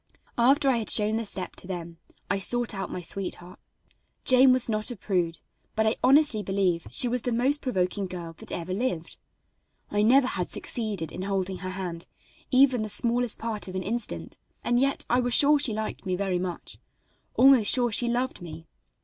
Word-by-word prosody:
After 275 +4 +4
I 260 -3 +3
had 225 - -2
shown 215 +1 +4
the 230 - -3
step 190 -2 -2
to - - -8
them 170 -3 -6 0.3
I 195 +1 0
sought 240 +4 -2
out 195 -1 -4
my 180 - -5
sweetheart. 180 0 -5 0.7
Jane 255 0 +6
was 255 -1 +3
not 215 0 -1
a 245 - -5
prude, 175 -6 -2 0.3
but 220 - +1
I 220 - +2
honestly 270 -4 +4
believe 190 -3 -1
she 250 - +3
was 245 0 -1
the 245 - -2
most 260 +5 +1
provoking 190 -4 -1
girl 175 -2 -7
that - - -12
ever 175 +2 -4
lived. 190 -6 -3 0.7
I 205 - +1
never 250 +5 +5
had 180 -8 -3
succeeded 205 -9 -3
in - - -6
holding 190 -1 -2
her 185 - -5
hand 180 -3 -6 0.4
even 260 -2 +4
the 215 - -3
smallest 235 +2 0
part 220 -3 -3
of 185 - -7
an 185 - -2
instant, 230 +3 -3 0.2
and 240 0 +1
yet 275 +1 0
I 245 - +2
was 245 -1 +1
sure 295 +1 +6
she 280 -5 -1
liked 215 0 -4
me 185 -2 -2
very 190 -1 -1
much; 180 -1 -5 0.6
almost 255 -5 +6
sure 245 -2 +1
she 240 +3 +1
loved 245 -1 -2
me. 165 -1 -9
215 Hz, 190 wpm, -26 LUFS, 185-245 Hz, 0.7 s, Jane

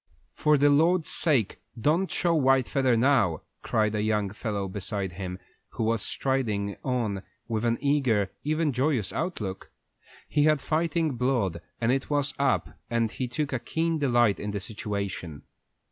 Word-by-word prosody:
"For 150 -1 +3
the 145 +1 +4
Lord's 165 +3 +3
sake, 135 - +1 0.2
don't 165 - +2
show 175 -2 +1
the 160 - +2
white 135 -1 +4
feather 130 -4 +2
now!" 115 - +2 0.2
cried 110 -1 +1
a 105 - 0
young 105 -2 0
fellow 105 -2 -3
beside 95 0 -3
him, 90 0 -5 0.4
who - - -2
was 115 -1 +1
striding 110 -8 -1
on 115 -7 -1 0.3
with 115 -1 -1
an 115 0 +2
eager, 130 -9 +2
even 155 -1 0
joyous 130 -4 0
outlook. 100 - -3 0.6
He 150 -1 +2
had 155 -1 +4
fighting 160 -2 0
blood, 115 -9 0 0.2
and 115 +1 +2
it 135 +1 -1
was 145 -1 +1
up, 140 -1 0
and 115 -2 +1
he 130 - -3
took 140 +4 -2
a 130 - 0
keen 165 +4 -1
delight 120 -7 +3
in 105 - -4
the 100 0 -2
situation. 100 -6 -5
120 Hz, 160 wpm, -27 LUFS, 105-145 Hz, 0.6 s, the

